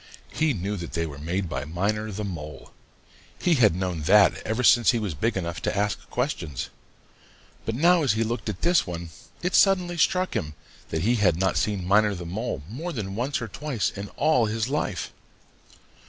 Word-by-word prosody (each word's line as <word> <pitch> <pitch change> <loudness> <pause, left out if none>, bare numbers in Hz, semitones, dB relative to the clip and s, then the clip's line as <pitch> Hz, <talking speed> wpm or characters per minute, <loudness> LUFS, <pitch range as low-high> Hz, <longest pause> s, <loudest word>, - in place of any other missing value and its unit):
He 155 -4 +1
knew 100 +2 -3
that 85 -2 -7
they 85 -1 0
were 70 -3 -8
made 90 +5 -2
by 70 -5 -3
Miner 105 +8 -2
the 105 +2 -4
Mole. 80 -6 -7 0.7
He 175 - +3
had 110 - +4
known 90 -3 -2
that 105 0 +6
ever 110 +3 -2
since 120 0 +6
he 120 - +4
was 105 -6 -2
big 110 +10 -1
enough 85 -2 -3
to - - 0
begin - - -2
to - - 0
ask 105 0 -2
questions. 75 -6 -3 1.0
But 110 - -2
now 170 +5 +4
as 135 -7 +2
he 110 +1 +1
looked 115 0 -3
at 100 - -6
this 175 - +3
one, 85 -1 -6 0.3
it 180 +1 0
suddenly 180 -3 +4
struck 185 +1 +2
him 75 -9 -3 0.3
that 80 0 -2
he 120 +4 +3
had 90 -6 +3
not 95 +1 +1
seen 100 -4 -1
Miner 105 +1 +4
the 85 -1 -7
Mole 95 - -4
more 150 - -5
than 105 - -4
once 125 +4 -2
or - - -4
twice 130 0 -2
in 100 +1 -6
all 155 -8 +3
his 110 +3 -1
life. 105 - -2
105 Hz, 200 wpm, -25 LUFS, 90-120 Hz, 1.0 s, that